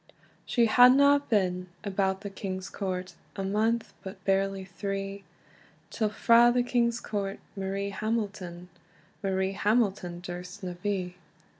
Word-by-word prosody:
She 240 -2 +3
hadna 265 +5 +7
been 185 -4 +1 0.2
about 190 -1 0
the 200 -1 -6
king's 190 -1 -5
court 185 -2 -4 0.2
A 195 - -3
month, 220 +4 0
but 190 -1 -9
barely 195 0 +1
three, 195 +1 -4 0.7
Till 220 -2 0
frae 235 +2 +5
the 245 0 +2
king's 235 -1 +1
court 200 -3 -3 0.2
Marie 195 +1 -3
Hamilton, 200 -5 -3 0.5
Marie 190 -1 0
Hamilton 200 -4 +1
durst 180 +2 -8
na 180 -1 -3
be. 185 -3 -2
195 Hz, 125 wpm, -28 LUFS, 190-220 Hz, 0.7 s, hadna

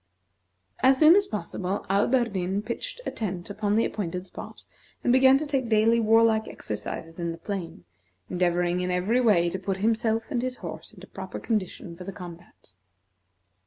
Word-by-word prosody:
As 265 +1 +5
soon 315 +4 +8
as 405 0 +3
possible, 200 -2 -3
Alberdin 200 -2 +1
pitched - - -5
a - - -2
tent 185 -3 -4
upon 205 0 0
the 225 - +3
appointed 180 -3 -4
spot, 185 - -10 0.4
and 245 - +3
began 260 +1 +6
to 305 - -3
take 270 -5 -1
daily 225 +1 +4
warlike 225 0 +4
exercise 160 - -6
in 170 -1 -2
the 165 - -7
plain, 175 - -6 0.4
endeavoring 175 +1 +1
in 180 0 -1
every 190 +8 +1
way 200 -8 +4
to 190 - -3
put 190 0 -2
himself 225 +2 +1
and 245 -4 0
his 255 0 -3
horse - - -8
into - - -13
proper - - -7
condition 185 -5 -3
for 180 - -9
the 195 - -6
combat. 175 - -12
205 Hz, 165 wpm, -26 LUFS, 180-235 Hz, 0.4 s, soon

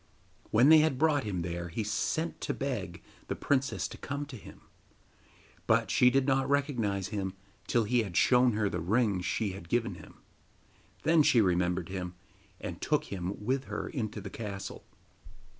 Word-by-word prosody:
When 120 +6 +5
they 160 0 +9
had 155 -4 +2
brought 150 -3 +2
him 95 -5 -2
there 85 0 -4
he 110 +7 -3
sent 105 +11 -2
to - - -2
beg 95 -11 -4 0.2
the - - -2
princess 140 -1 0
to - - -10
come 140 +1 -4
to 140 -2 -10
him; 110 - -12 1.1
but - - +3
she 125 - +6
did 135 +1 +2
not 135 -1 +1
recognise 115 -10 0
him 100 -3 -3 0.3
till 120 - +2
he 120 +3 +2
had 95 -6 -4
shown 125 -1 +5
her 105 -1 +1
the 90 - -2
ring 100 +2 +1
she 100 +3 -1
had 95 -3 -10
given 120 -1 0
him. - - -13 0.9
Then 160 0 +5
she 130 -4 +5
remembered 90 -2 +1
him, 90 -2 -5 0.4
and - - -6
took - - 0
him 95 +2 -4
with 130 +3 0
her - - -4
into 110 -6 -4
the 100 0 -8
castle. 100 -3 -6
110 Hz, 175 wpm, -30 LUFS, 95-135 Hz, 1.1 s, they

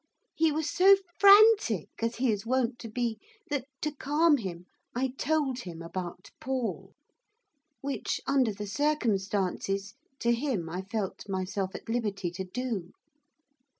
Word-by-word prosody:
He 320 0 +3
was 310 +1 -1
so 385 +3 +6 0.2
frantic, 400 - +7
as 230 +1 0
he 250 -1 +2
is 205 -2 -2
wont 245 0 0
to 230 - -7
be, 235 0 -2 0.3
that, 275 -3 -1 0.2
to 305 - 0
calm 295 +2 +3
him, 180 -6 -6 0.3
I 260 +2 +1
told 270 -1 0
him 170 -6 -7
about 180 +1 -6
Paul, 260 -3 -3 0.9
which, 280 0 -2
under 265 -5 +2
the 205 +1 -6
circumstances, 200 -6 0 0.2
to 235 -3 +1
him 235 - -1
I 180 +2 -3
felt 200 0 -4
myself 190 0 -2
at - - -8
liberty 205 -6 -1
to 185 +2 -5
do. 205 -2 -4
230 Hz, 140 wpm, -29 LUFS, 195-275 Hz, 0.9 s, frantic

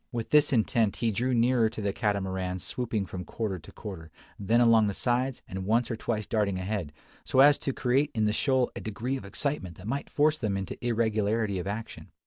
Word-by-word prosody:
With 115 -2 -4
this 150 0 +5
intent 115 -3 +2
he 115 -2 0
drew 125 +5 0
nearer 120 -1 +3
to 110 - -8
the 100 -2 -1
Catamaran 95 -3 -1
swooping 105 +3 -3
from 90 -1 -6
quarter 100 -4 -3
to - - -14
quarter, 90 -7 -8 0.3
then 110 +4 +2
along 115 -3 +5
the 100 - -2
sides, 125 +1 0
and 95 0 -5
once 115 +5 +1
or - - -1
twice 110 -1 -2
darting 105 -5 0
ahead, 95 -4 -3 0.3
so 130 - 0
as 145 +1 +7
to 135 - -1
create 135 +3 +1
in 110 -1 +2
the 105 - +1
shoal 130 +1 +2
a - - -5
degree 110 +5 -3
of 130 - -6
excitement 100 - -3
that 95 - -11
might 140 +6 -3
force 155 +1 +2
them 105 -4 -1
into 95 +4 -6
irregularity 110 -3 0
of 90 - -5
action. 110 +3 -6
110 Hz, 210 wpm, -28 LUFS, 100-125 Hz, 0.3 s, as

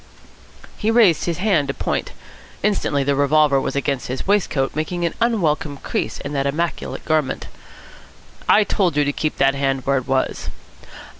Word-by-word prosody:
He 215 - 0
raised 225 -8 +4
his 170 -2 -1
hand 180 -7 +2
to 140 - -3
point. - - -2 0.5
Instantly 195 -9 +1
the 140 +1 +1
revolver 140 0 +3
was - - -3
against 140 -2 -1
his 130 +1 -4
waistcoat, 175 -10 +1
making 170 +3 -2
an 170 - -1
unwelcome 160 -11 +1
crease - - -3
in 140 +1 -6
that 140 -1 0
immaculate 165 +4 -3
garment. 155 -4 0 1.0
"I 210 - +6
told 185 -6 0
you 145 - +3
to 145 - 0
keep 155 +1 -2
that 135 0 +3
hand 135 -2 -1
where 140 0 +2
it 125 - -11
was." 130 0 -1
150 Hz, 165 wpm, -21 LUFS, 140-175 Hz, 1.0 s, I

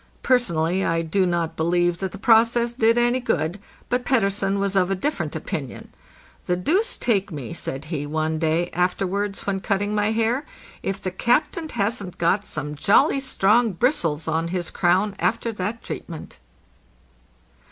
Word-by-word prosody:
Personally 190 - +2
I 165 -2 0
do 185 +3 +1
not 170 -2 -1
believe 175 +1 +1
that 190 -2 -3
the - - -8
process 230 +2 +4
did 230 -1 +3
any 240 +1 +3
good, 180 -6 -1 0.3
but 250 0 0
Pettersen 200 -5 +1
was 200 0 -1
of 185 -1 +3
a 195 - +1
different 290 +11 -2
opinion. - - -5 0.6
'The 180 - +2
deuce 365 - +1
take 200 -5 0
me," 140 -7 -6
said 135 +3 -4
he, 150 -3 -4
one 155 +1 -1
day 165 +2 0
afterwards 195 +3 -1
when 195 -1 -1
cutting 205 +1 -1
my 210 0 +1
hair, 230 +5 +1 0.4
'if 195 0 -3
the 185 - -4
captain 300 - 0
hasn't 205 -5 -2
got 190 +5 +1
some 150 - -4
jolly 265 - +3
strong 230 -3 +2
bristles 170 - 0
on 160 +1 0
his 175 -1 -2
crown 190 +3 +2
after 225 +6 0
that 210 +2 -4
treatment." 165 -3 -8
195 Hz, 155 wpm, -23 LUFS, 170-230 Hz, 0.6 s, process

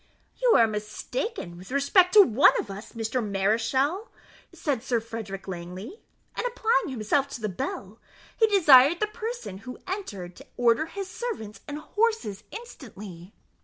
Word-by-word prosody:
"You - - +5
are 230 - +7
mistaken 210 - -4
with 185 - -12
respect 315 +7 +3
to 420 - +11
one 265 - +5
of 200 - -5
us, 200 +3 -9
Mr. 230 +1 -2
Mareschal," 230 - 0 0.4
said 275 -7 -2
Sir 235 0 0
Frederick 220 -4 -7
Langley; 185 - -7 0.4
and, - - -2
applying 465 -3 +1
himself 260 +3 0
to 275 - -7
the 215 - -1
bell, 195 +2 -5 0.4
he 445 - +4
desired 320 -6 +6
the 425 - +2
person 445 - -6
who 250 +4 -9
entered 200 - -5
to 275 - -14
order 240 +5 +3
his 390 +2 -6
servants 375 - -6
and 290 0 -5
horses 420 - -1
instantly. 210 - -10
250 Hz, 150 wpm, -26 LUFS, -, 0.4 s, to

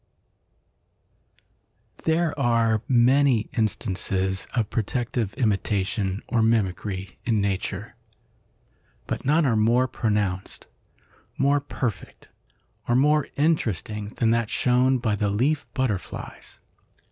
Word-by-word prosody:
There 165 0 +2
are 115 -4 +2
many 125 -1 +3
instances 95 -3 -1
of 115 -4 0
protective 115 -1 -2
imitation 100 -3 -1
or 120 -2 +1
mimicry 100 -3 -1
in 110 -3 +1
nature, 100 -2 -2 1.1
but - - -4
none 155 +4 +3
are 120 -4 +2
more 120 +4 +3
pronounced, 105 -6 -2 0.7
more 140 +1 +3
perfect 125 - -5 0.6
or 120 - +2
more 150 +3 +3
interesting 110 - 0
than 115 -2 +2
that 115 -2 +1
shown 125 +1 +2
by 115 -4 0
the 105 0 0
leaf 130 +9 0
butterflies. 120 -8 -4
115 Hz, 100 wpm, -25 LUFS, 105-130 Hz, 1.1 s, many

